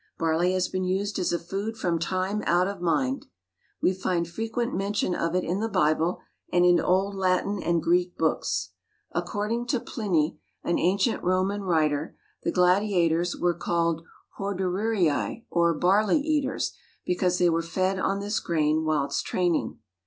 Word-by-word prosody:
Barley 165 +3 +1
has 185 -1 +1
been 185 0 -2
used 195 +2 -1
as 180 - 0
a 170 - +1
food 200 +6 -4
from 170 -5 0
time 185 +4 -1
out 175 +2 +3
of 200 -3 -5
mind. 260 +10 0 0.6
We 185 - +4
find 180 -2 -1
frequent 225 +6 -3
mention 195 -1 0
of 165 0 -1
it 185 - +1
in 180 +4 -1
the 225 +1 -1
Bible, 165 -2 +1 0.3
and 175 0 +4
in 175 -1 +5
old 190 +4 +1
Latin 190 +1 0
and 170 -2 0
Greek 175 +1 +1
books. 160 -1 0 0.4
According 225 +4 -2
to 250 0 +1
Pliny, 175 -10 -1 0.2
an 170 - 0
ancient 195 +5 +1
Roman 185 +3 +1
writer, 155 -4 0 0.2
the - - -1
gladiators 180 -2 +2
were 175 -1 +1
called 170 -1 -1 0.4
Hordearii, 195 0 0
or 170 -1 +3
"barley 200 - +3
eaters," 290 -2 -1 0.3
because 180 0 +1
they 175 -1 +3
were 165 0 +1
fed 185 +3 -1
on 195 +1 0
this 205 +1 -1
grain 155 -1 +1
whilst 150 -3 0
training. 175 -3 0
180 Hz, 155 wpm, -26 LUFS, 170-200 Hz, 0.6 s, in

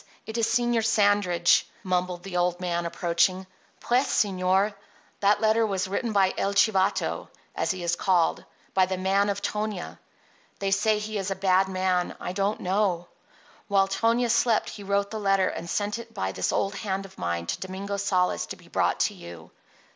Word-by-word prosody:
_ - - -24 0.2
it 220 - -7
is 230 -1 +2
Señor 235 0 +1
Sandridge," 205 -5 +3 0.2
mumbled 180 -1 -1
the 195 -2 -7
old 175 0 +1
man, 175 -1 -1
approaching. 175 +2 +1 0.4
"Pues, 250 +3 +2
señor, 190 0 +1 0.5
that 205 +1 +3
letter 220 +1 +3
was 195 -3 -1
written 210 +4 -2
by 195 -2 +3
'El 200 +1 0
Chivato,' 200 -1 +2 0.3
as - - -1
he 185 -2 -2
is 170 0 +1
called—by 185 +1 0
the 185 0 -2
man 195 +2 +2
of 200 - -3
Tonia. 210 -3 -3 0.6
They 195 -1 -2
say 210 +2 +3
he 210 0 -4
is 195 0 -3
a 195 - -1
bad 190 0 +3
man; 185 -1 0
I - - -4
do 195 - -3
not 205 +2 0
know. 185 -2 0 0.6
While 195 -2 +3
Tonia 230 +4 +1
slept 230 -1 +2
he 210 - -9
wrote 200 0 0
the 220 - -4
letter 195 -2 +2
and 170 - -6
sent 210 +4 -1
it 230 -1 -11
by 95 0 -2
this 95 -1 -1
old 200 0 0
hand 195 -1 -3
of 190 - -14
mine 85 -1 -2
to 85 - -3
Domingo 195 +2 -5
Sales 185 -2 0
to - - -6
be - - -19
brought - - +1
to - - +1
you. 85 -2 -11
195 Hz, 185 wpm, -26 LUFS, 180-210 Hz, 0.6 s, Sandridge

